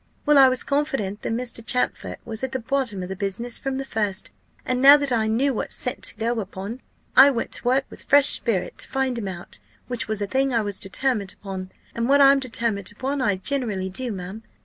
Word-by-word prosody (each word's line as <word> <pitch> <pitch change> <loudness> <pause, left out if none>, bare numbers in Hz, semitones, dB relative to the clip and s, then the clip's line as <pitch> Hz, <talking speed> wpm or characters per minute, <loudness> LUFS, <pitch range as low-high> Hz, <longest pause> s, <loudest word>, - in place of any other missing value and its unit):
Well, 295 -2 +5
I 265 -1 +8
was 255 0 -1
confident 270 -9 -2
that - - -3
Mr. 235 0 -2
Champfort 250 +2 -1
was 225 +1 -5
at 265 0 -3
the 260 - -1
bottom 245 -6 -2
of 180 - -7
the 190 - -4
business 200 +5 -2
from 270 -1 -3
the 270 - -4
first; 210 -5 -2 0.3
and 250 0 -1
now 280 +2 +9
that 285 -2 -1
I 225 -2 +1
knew 260 +5 +1
what - - -4
scent 250 +2 -2
to - - -4
go 230 +2 -1
upon, 205 +4 -6 0.3
I 270 +2 +9
went 240 -4 -3
to - - -3
work 260 +2 +2
with - - -12
fresh 285 -1 +6
spirit 205 -7 0
to - - -2
find 265 -2 -1
him 205 - -4
out, 175 -2 -8 0.3
which 245 -2 -3
was 215 -1 -2
a 205 - -1
thing 265 +4 0
I 230 - +3
was 205 -2 -5
determined 205 -1 -1
upon 190 -2 -7 0.2
and 235 +2 -2
what 280 +1 +5
I'm 275 0 +6
determined 230 -6 -1
upon, 270 +6 -3
I 205 -5 +2
generally 200 -3 -2
do, 245 +6 -4
ma'am. 190 +2 -7
235 Hz, 225 wpm, -23 LUFS, 205-265 Hz, 0.3 s, now